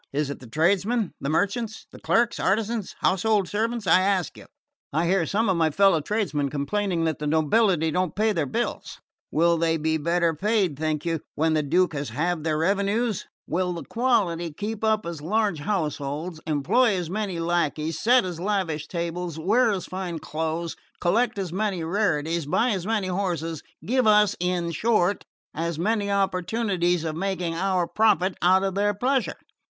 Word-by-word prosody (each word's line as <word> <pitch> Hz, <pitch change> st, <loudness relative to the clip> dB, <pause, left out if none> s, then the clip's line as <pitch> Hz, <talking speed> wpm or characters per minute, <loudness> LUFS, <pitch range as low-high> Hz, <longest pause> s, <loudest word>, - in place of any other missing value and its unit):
Is 145 Hz, 0 st, -1 dB
it 140 Hz, -, -7 dB
the 125 Hz, -, -12 dB
tradesmen? 195 Hz, -, +1 dB
The 140 Hz, -, -2 dB
merchants? 205 Hz, +6 st, -1 dB
The -, -, -12 dB
clerks, 235 Hz, 0 st, +1 dB
artisans, 215 Hz, +1 st, -1 dB
household 195 Hz, +1 st, +2 dB
servants, 225 Hz, +2 st, -2 dB
I 185 Hz, +1 st, +5 dB
ask 190 Hz, -2 st, 0 dB
you? -, -, -13 dB, 0.4 s
I 160 Hz, +4 st, +1 dB
hear 175 Hz, -1 st, +2 dB
some 220 Hz, +3 st, +1 dB
of 190 Hz, -3 st, +2 dB
my 160 Hz, -1 st, +3 dB
fellow 195 Hz, 0 st, +4 dB
tradesmen 150 Hz, -6 st, -1 dB
complaining 170 Hz, +5 st, -1 dB
that 160 Hz, -3 st, -1 dB
the 150 Hz, -, -3 dB
nobility 160 Hz, +2 st, +2 dB
don't 180 Hz, -1 st, -1 dB
pay 215 Hz, +1 st, +2 dB
their 160 Hz, -6 st, -1 dB
bills. -, -, -3 dB, 0.3 s
Will 170 Hz, +1 st, +2 dB
they 165 Hz, 0 st, +2 dB
be 160 Hz, +1 st, 0 dB
better 170 Hz, +2 st, +1 dB
paid, 195 Hz, -1 st, +1 dB
think 155 Hz, +1 st, -2 dB
you, 165 Hz, -1 st, 0 dB, 0.2 s
when 160 Hz, +1 st, +1 dB
the 155 Hz, -, +2 dB
Duke 170 Hz, +4 st, +2 dB
has 145 Hz, -3 st, -3 dB
halved 160 Hz, +6 st, -1 dB
their 155 Hz, -1 st, 0 dB
revenues? 200 Hz, +5 st, 0 dB, 0.2 s
Will 180 Hz, +2 st, -1 dB
the 170 Hz, -, -6 dB
quality 195 Hz, -9 st, 0 dB
keep 210 Hz, +7 st, -5 dB
up 220 Hz, -1 st, +2 dB
as 170 Hz, -3 st, -5 dB
large 200 Hz, 0 st, 0 dB
households, 155 Hz, -1 st, -3 dB
employ 195 Hz, -, +2 dB
as 180 Hz, -3 st, -2 dB
many 195 Hz, -4 st, -2 dB
lacqueys, 165 Hz, -2 st, -1 dB
set 245 Hz, -1 st, +4 dB
as 175 Hz, -3 st, -5 dB
lavish 175 Hz, -6 st, -1 dB
tables, 170 Hz, -1 st, -4 dB
wear 220 Hz, +9 st, +3 dB
as 195 Hz, -4 st, -2 dB
fine 185 Hz, -2 st, -4 dB
clothes, 160 Hz, +2 st, -3 dB, 0.2 s
collect 215 Hz, +7 st, +1 dB
as 185 Hz, -4 st, -3 dB
many 195 Hz, -3 st, -1 dB
rarities, 165 Hz, -4 st, 0 dB
buy 235 Hz, +11 st, +2 dB
as 190 Hz, -2 st, -2 dB
many 210 Hz, -4 st, 0 dB
horses, 170 Hz, -4 st, -2 dB, 0.2 s
give 255 Hz, 0 st, +2 dB
us, 210 Hz, -2 st, +5 dB
in 180 Hz, -1 st, -1 dB
short, 205 Hz, 0 st, +1 dB, 0.3 s
as 165 Hz, 0 st, -3 dB
many 205 Hz, +3 st, 0 dB
opportunities 190 Hz, -2 st, 0 dB
of 160 Hz, -1 st, -3 dB
making 180 Hz, -1 st, -2 dB
our 185 Hz, +1 st, 0 dB
profit 195 Hz, -3 st, +2 dB
out 185 Hz, +2 st, +4 dB
of 195 Hz, -1 st, -1 dB
their 205 Hz, +1 st, +1 dB
pleasure? 255 Hz, +5 st, 0 dB
180 Hz, 175 wpm, -25 LUFS, 160-205 Hz, 0.4 s, I